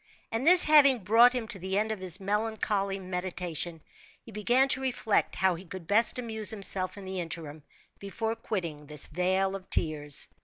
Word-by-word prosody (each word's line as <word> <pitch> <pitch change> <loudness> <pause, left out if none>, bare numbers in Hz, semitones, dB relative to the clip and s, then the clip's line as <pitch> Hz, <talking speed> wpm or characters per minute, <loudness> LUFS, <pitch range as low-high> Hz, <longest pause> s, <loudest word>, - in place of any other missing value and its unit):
And 230 +6 -2
this 360 +1 +11
having 290 -4 +5
brought 230 +5 +5
him 245 -3 -4
to 195 - -2
the 190 +2 -3
end 215 +1 -1
of 215 - -5
his 185 0 -1
melancholy 205 -1 -2
meditation, 180 -3 -5 0.4
he 230 - -15
began 240 +6 +1
to 265 - +2
reflect 245 -5 -1
how 190 -1 +1
he 175 +2 -9
could 185 -1 -10
best 220 +8 +2
amuse 220 -3 -3
himself 195 -3 -2
in 200 - -10
the 190 0 -5
interim, 160 -3 -6 0.4
before 225 +3 -4
quitting 170 -10 -6
this 150 -1 -2
vale 190 +4 -1
of 190 -1 -11
tears. 150 -3 0
195 Hz, 180 wpm, -27 LUFS, 180-225 Hz, 0.4 s, this